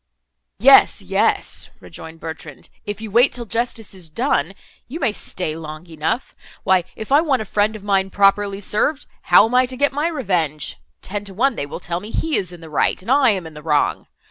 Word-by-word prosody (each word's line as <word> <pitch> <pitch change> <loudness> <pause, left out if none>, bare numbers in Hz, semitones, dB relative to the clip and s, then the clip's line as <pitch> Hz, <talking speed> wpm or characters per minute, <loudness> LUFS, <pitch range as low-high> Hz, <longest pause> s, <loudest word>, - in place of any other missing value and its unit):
"Yes, - - +6
yes," - - 0
rejoined 160 - -11
Bertrand, 160 -4 -9 0.2
"if 205 +1 -5
you 220 -2 -7
wait 240 +5 +5
till 240 -1 -6
justice 230 -1 -3
is 180 -4 -9
done 195 - 0 0.3
you—you 290 +8 -6
may 275 - +1
stay 180 -6 -4
long 155 0 -8
enough. 165 +9 -3 0.3
Why 185 -3 +3
if 220 +3 -8
I 285 +2 +6
want 275 -8 +1
a - - -13
friend 210 +2 0
of 210 - -9
mine 195 -2 +1
properly 200 0 +2
served, 270 +9 0 0.2
how 180 +4 +6
am 225 - -4
I 255 0 +4
to 255 0 -6
get 285 +1 +2
my 295 +3 0
revenge? 175 - -2 0.2
Ten 205 +1 -4
to 195 -2 -9
one 265 +5 +2
they 145 - -4
will - - -7
tell 170 0 -3
me 205 +4 -10
he 315 +6 -1
is 180 -3 -1
in 175 -1 -12
the 165 - -10
right, 150 - +1
and 195 +7 -4
I 270 -2 +5
am 190 -5 0
in 160 - -9
the 150 - -10
wrong. 150 -2 0
200 Hz, 215 wpm, -20 LUFS, 165-240 Hz, 0.3 s, Yes